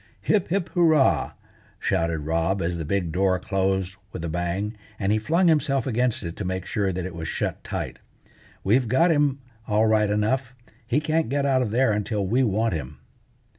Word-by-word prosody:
"Hip, 205 Hz, -4 st, +1 dB
hip, 185 Hz, 0 st, -1 dB
hurrah!" 160 Hz, -6 st, +3 dB, 0.4 s
shouted 85 Hz, -1 st, 0 dB
Rob 85 Hz, +5 st, 0 dB
as 85 Hz, 0 st, -1 dB
the 80 Hz, -, -4 dB
big 90 Hz, 0 st, -1 dB
door 95 Hz, +2 st, +2 dB
closed 95 Hz, 0 st, -1 dB
with 85 Hz, -, -5 dB
a -, -, -3 dB
bang, 90 Hz, +6 st, -2 dB, 0.2 s
and 100 Hz, -1 st, 0 dB
he 110 Hz, -, +2 dB
flung 170 Hz, -, +2 dB
himself 140 Hz, -5 st, +2 dB
against 125 Hz, -1 st, 0 dB
it 85 Hz, -1 st, -5 dB
to -, -, -3 dB
make 95 Hz, 0 st, -3 dB
sure 100 Hz, -2 st, 0 dB
that 90 Hz, 0 st, -3 dB
it 90 Hz, -, -6 dB
was 80 Hz, -1 st, -5 dB
shut -, -, -3 dB
tight. -, -, -5 dB, 0.6 s
"We've 120 Hz, +5 st, +3 dB
got 165 Hz, +9 st, +4 dB
him 145 Hz, -3 st, +2 dB, 0.3 s
all 110 Hz, +1 st, +3 dB
right 110 Hz, -1 st, +3 dB
enough. 120 Hz, +5 st, 0 dB, 0.3 s
He 135 Hz, -, +2 dB
can't 155 Hz, -2 st, 0 dB
get 140 Hz, +1 st, 0 dB
out 135 Hz, -2 st, +3 dB
of 120 Hz, -, -1 dB
there 120 Hz, +1 st, +2 dB
until 105 Hz, -1 st, -1 dB
we 120 Hz, +8 st, +2 dB
want 110 Hz, -2 st, +1 dB
him." 70 Hz, -6 st, -5 dB
105 Hz, 190 wpm, -24 LUFS, 95-130 Hz, 0.6 s, got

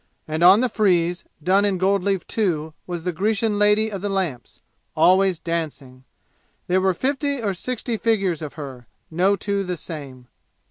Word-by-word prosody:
And 155 Hz, +1 st, -3 dB
on 190 Hz, +5 st, +8 dB
the 255 Hz, -, +2 dB
frieze, 180 Hz, -6 st, +1 dB, 0.2 s
done 190 Hz, +4 st, +3 dB
in 200 Hz, -2 st, +1 dB
gold 195 Hz, +2 st, +2 dB
leaf 195 Hz, -2 st, 0 dB
too, 160 Hz, -8 st, -1 dB
was 175 Hz, -2 st, -5 dB
the 180 Hz, -, -1 dB
Grecian 210 Hz, +4 st, 0 dB
lady 210 Hz, +1 st, +3 dB
of 195 Hz, -3 st, -5 dB
the 205 Hz, -, -2 dB
lamps, 180 Hz, -11 st, -3 dB, 0.4 s
always 190 Hz, 0 st, +4 dB
dancing. 150 Hz, -6 st, -5 dB, 0.6 s
There 185 Hz, +1 st, +1 dB
were 190 Hz, -1 st, +2 dB
fifty 280 Hz, -, -1 dB
or 205 Hz, -4 st, -1 dB
sixty 235 Hz, +3 st, -3 dB
figures 195 Hz, -8 st, 0 dB
of 150 Hz, -2 st, -6 dB
her, 135 Hz, -6 st, -8 dB, 0.2 s
no 185 Hz, +5 st, +2 dB
two 200 Hz, 0 st, -2 dB
the 180 Hz, -2 st, -4 dB
same. 140 Hz, -6 st, -8 dB
185 Hz, 170 wpm, -22 LUFS, 165-205 Hz, 0.6 s, on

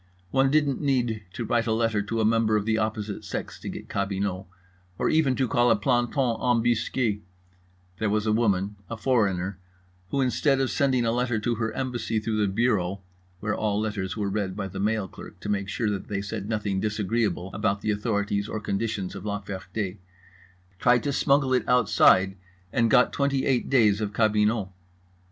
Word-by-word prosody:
One 135 Hz, 0 st, +3 dB
didn't 145 Hz, -2 st, +2 dB
need 120 Hz, -7 st, 0 dB
to 120 Hz, -, -4 dB
write 120 Hz, 0 st, +1 dB
a -, -, +1 dB
letter 110 Hz, -2 st, +1 dB
to 115 Hz, +3 st, -3 dB
a 110 Hz, -, +2 dB
member 110 Hz, -1 st, +3 dB
of 105 Hz, -1 st, 0 dB
the 110 Hz, 0 st, +1 dB
opposite 110 Hz, -1 st, -3 dB
sex -, -, -5 dB
to -, -, -6 dB
get -, -, -7 dB
cabinot, 100 Hz, -1 st, -2 dB, 0.5 s
or -, -, +1 dB
even 150 Hz, -5 st, +3 dB
to 130 Hz, 0 st, +1 dB
call 120 Hz, +1 st, +3 dB
a 115 Hz, -, +5 dB
planton 120 Hz, +2 st, +1 dB
embusqué—there 100 Hz, -6 st, -2 dB
was 105 Hz, +1 st, 0 dB
a 110 Hz, -, +2 dB
woman, 100 Hz, -3 st, +1 dB
a 115 Hz, -, -4 dB
foreigner, 100 Hz, -7 st, 0 dB, 0.5 s
who, 140 Hz, -, -1 dB
instead 135 Hz, +1 st, +2 dB
of 130 Hz, -4 st, 0 dB
sending 130 Hz, -1 st, +2 dB
a 115 Hz, -, +2 dB
letter 120 Hz, -1 st, 0 dB
to 120 Hz, +2 st, 0 dB
her 115 Hz, 0 st, -2 dB
embassy 120 Hz, -3 st, -2 dB
through 110 Hz, 0 st, -2 dB
the 100 Hz, -2 st, +1 dB
bureau 100 Hz, -4 st, 0 dB, 0.4 s
(where 110 Hz, +1 st, -1 dB
all 105 Hz, -1 st, 0 dB
letters 105 Hz, -4 st, -3 dB
were 105 Hz, -2 st, -1 dB
read 95 Hz, -2 st, -2 dB
by 100 Hz, -1 st, -3 dB
the 95 Hz, +1 st, -7 dB
mail 105 Hz, 0 st, 0 dB
clerk -, -, -12 dB
to -, -, -5 dB
make 100 Hz, -1 st, -1 dB
sure 110 Hz, 0 st, -1 dB
that 100 Hz, -2 st, -4 dB
they 100 Hz, -1 st, -3 dB
said 105 Hz, 0 st, -5 dB
nothing 105 Hz, -3 st, -1 dB
disagreeable 105 Hz, -2 st, -1 dB
about 100 Hz, -1 st, 0 dB
the 110 Hz, -, 0 dB
authorities 100 Hz, -1 st, -1 dB
or 110 Hz, -, -3 dB
conditions 100 Hz, -2 st, -2 dB
of -, -, -8 dB
La 100 Hz, -1 st, -2 dB
Ferté) 95 Hz, +1 st, -5 dB, 0.8 s
tried 125 Hz, -1 st, +4 dB
to 140 Hz, -, -1 dB
smuggle 135 Hz, -1 st, +2 dB
it 125 Hz, -, +1 dB
outside, 95 Hz, -5 st, +4 dB, 0.4 s
and 115 Hz, -1 st, +3 dB
got 125 Hz, +2 st, +4 dB
twenty 140 Hz, -1 st, +1 dB
eight 130 Hz, -3 st, +1 dB
days 110 Hz, -6 st, +4 dB
of 105 Hz, -1 st, -3 dB
cabinot. 105 Hz, -1 st, +2 dB
110 Hz, 185 wpm, -26 LUFS, 100-120 Hz, 0.8 s, a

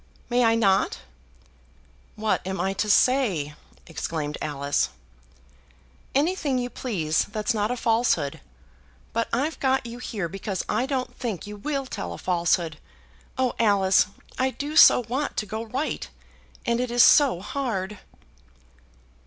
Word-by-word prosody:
"May 245 Hz, +1 st, +3 dB
I 225 Hz, -1 st, +4 dB
not?" 195 Hz, -4 st, +2 dB, 1.1 s
"What 215 Hz, 0 st, 0 dB
am 190 Hz, +1 st, -4 dB
I 195 Hz, -, 0 dB
to 210 Hz, +2 st, -2 dB
say?" 205 Hz, -, +3 dB, 0.3 s
exclaimed 155 Hz, -2 st, -4 dB
Alice. 145 Hz, -1 st, 0 dB, 1.3 s
"Anything 290 Hz, -2 st, +1 dB
you 245 Hz, 0 st, -2 dB
please, 165 Hz, -11 st, -1 dB
that's 210 Hz, +2 st, -2 dB
not 210 Hz, -1 st, 0 dB
a 250 Hz, -, -2 dB
falsehood. 230 Hz, +1 st, +1 dB, 0.7 s
But 230 Hz, 0 st, -1 dB
I've 285 Hz, +7 st, -1 dB
got 265 Hz, -2 st, +1 dB
you 235 Hz, +1 st, -7 dB
here 205 Hz, -7 st, -3 dB
because 195 Hz, +1 st, -4 dB
I 240 Hz, +5 st, 0 dB
don't 265 Hz, -2 st, -2 dB
think 225 Hz, -8 st, -3 dB
you 210 Hz, 0 st, -7 dB
will 275 Hz, +6 st, -3 dB
tell 85 Hz, -, -5 dB
a -, -, -7 dB
falsehood. 170 Hz, -3 st, 0 dB, 0.6 s
Oh, 260 Hz, -1 st, +1 dB
Alice, 200 Hz, -5 st, +4 dB, 0.3 s
I 260 Hz, +1 st, +2 dB
do 290 Hz, +3 st, -5 dB
so 320 Hz, -, +8 dB
want 270 Hz, +5 st, -2 dB
to 215 Hz, -, 0 dB
go 220 Hz, +2 st, -5 dB
right, 260 Hz, +7 st, -3 dB, 0.6 s
and 235 Hz, 0 st, +1 dB
it 250 Hz, 0 st, -1 dB
is 240 Hz, 0 st, +5 dB
so 275 Hz, -, +6 dB
hard!" 210 Hz, -4 st, -3 dB
225 Hz, 140 wpm, -25 LUFS, 190-255 Hz, 1.3 s, so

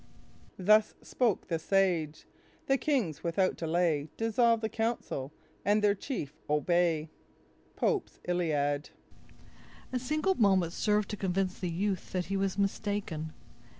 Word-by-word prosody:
"Thus 215 Hz, +3 st, +4 dB
spoke 235 Hz, -6 st, 0 dB
the 165 Hz, -3 st, -1 dB
sage: 170 Hz, -5 st, +1 dB, 0.4 s
the 270 Hz, 0 st, +2 dB
kings 235 Hz, -, 0 dB
without 185 Hz, +2 st, +1 dB
delay 160 Hz, -3 st, 0 dB
Dissolve 230 Hz, 0 st, +3 dB
the 220 Hz, -, 0 dB
council, 220 Hz, -, -2 dB, 0.3 s
and 210 Hz, +2 st, +2 dB
their 205 Hz, -1 st, +5 dB
chief 195 Hz, -, -5 dB, 0.2 s
obey." 160 Hz, 0 st, +2 dB, 0.6 s
—Pope's 420 Hz, -6 st, -1 dB
Iliad 150 Hz, -5 st, 0 dB, 1.0 s
A 250 Hz, -, +1 dB
single 305 Hz, +9 st, +1 dB
moment 190 Hz, -, +3 dB
served 210 Hz, +1 st, +1 dB
to 210 Hz, -, -4 dB
convince 185 Hz, -1 st, -1 dB
the 180 Hz, -, -2 dB
youth 190 Hz, +2 st, -2 dB
that 180 Hz, -1 st, 0 dB
he 195 Hz, +4 st, -3 dB
was 195 Hz, 0 st, 0 dB
mistaken. 200 Hz, -6 st, -2 dB
190 Hz, 125 wpm, -30 LUFS, 165-215 Hz, 1.0 s, their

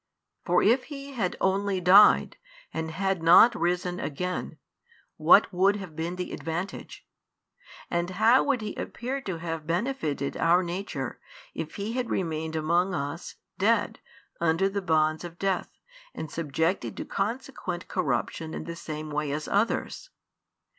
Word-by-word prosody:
For 180 Hz, -1 st, +2 dB
if 240 Hz, +5 st, +3 dB
He 280 Hz, -2 st, -8 dB
had 195 Hz, -8 st, -1 dB
only 195 Hz, 0 st, +1 dB
died, 185 Hz, +4 st, +6 dB, 0.4 s
and 160 Hz, 0 st, -3 dB
had 190 Hz, +2 st, -1 dB
not 175 Hz, +8 st, +7 dB
risen 180 Hz, -1 st, -1 dB
again, 180 Hz, +5 st, -4 dB, 0.6 s
what -, -, +5 dB
would 195 Hz, +3 st, +3 dB
have 190 Hz, -6 st, -8 dB
been 165 Hz, +2 st, -3 dB
the 180 Hz, 0 st, -5 dB
advantage? 170 Hz, +4 st, -5 dB, 0.8 s
And 175 Hz, +1 st, -1 dB
how 220 Hz, +7 st, +4 dB
would 275 Hz, -5 st, +1 dB
He 210 Hz, -1 st, -4 dB
appear 265 Hz, +3 st, -4 dB
to 190 Hz, -8 st, -4 dB
have 165 Hz, -2 st, -5 dB
benefitted 170 Hz, -, -1 dB
our 175 Hz, +2 st, +4 dB
nature, 170 Hz, -, -4 dB, 0.3 s
if 160 Hz, -, -6 dB
He 205 Hz, +3 st, -3 dB
had 250 Hz, -1 st, -2 dB
remained 160 Hz, -2 st, -2 dB
amongst 170 Hz, +4 st, +1 dB
us, 140 Hz, -1 st, -5 dB, 0.2 s
dead, -, -, +2 dB, 0.4 s
under 170 Hz, +3 st, +2 dB
the 200 Hz, +1 st, -2 dB
bonds 155 Hz, -2 st, +1 dB
of 170 Hz, -1 st, -8 dB
death, 195 Hz, -1 st, -1 dB, 0.5 s
and 155 Hz, -, -6 dB
subjected 165 Hz, +3 st, -1 dB
to -, -, -4 dB
consequent 205 Hz, -4 st, -4 dB
corruption 140 Hz, +5 st, -2 dB
in -, -, -5 dB
the 170 Hz, -, -6 dB
same 155 Hz, -2 st, -6 dB
way 150 Hz, -1 st, -1 dB
as 150 Hz, +1 st, -3 dB
others? 220 Hz, -, -1 dB
180 Hz, 145 wpm, -27 LUFS, 160-200 Hz, 0.8 s, not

